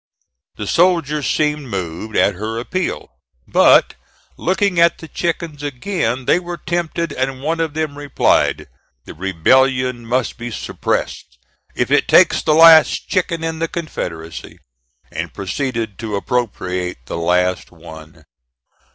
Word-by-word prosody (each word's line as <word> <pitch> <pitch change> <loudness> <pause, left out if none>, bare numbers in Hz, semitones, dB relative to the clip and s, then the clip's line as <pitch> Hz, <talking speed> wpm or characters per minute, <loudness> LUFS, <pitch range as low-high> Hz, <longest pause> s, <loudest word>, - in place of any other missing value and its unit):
The 105 - -5
soldiers 160 - +1
seemed 150 -2 0
moved 95 +1 -5
at 100 - +3
her 110 +4 -5
appeal; 145 - -3 0.4
but - - +5 0.4
looking 190 0 0
at 170 0 +4
the 160 - -11
chickens 165 -3 -3
again 135 - -2
they 175 - +3
were 175 -1 -6
tempted 170 -1 -2
and 130 0 -3
one 165 +2 -1
of 160 -2 -2
them 155 -2 -2
replied: 145 -1 +1 0.4
"The - - -9
rebellion 125 +8 +1
must 125 0 -1
be 120 0 -5
suppressed 65 - -3 0.4
if - - -1
it - - +3
takes - - +5
the 155 - +2
last 160 -1 +6
chicken 170 -3 -1
in 160 0 -3
the 165 - 0
Confederacy," 85 - -6 0.5
and - - -5
proceeded 115 0 -3
to 110 -2 -4
appropriate 90 - -3
the 85 - -5
last 90 +2 0
one. 80 0 -13
130 Hz, 135 wpm, -18 LUFS, 100-165 Hz, 0.5 s, last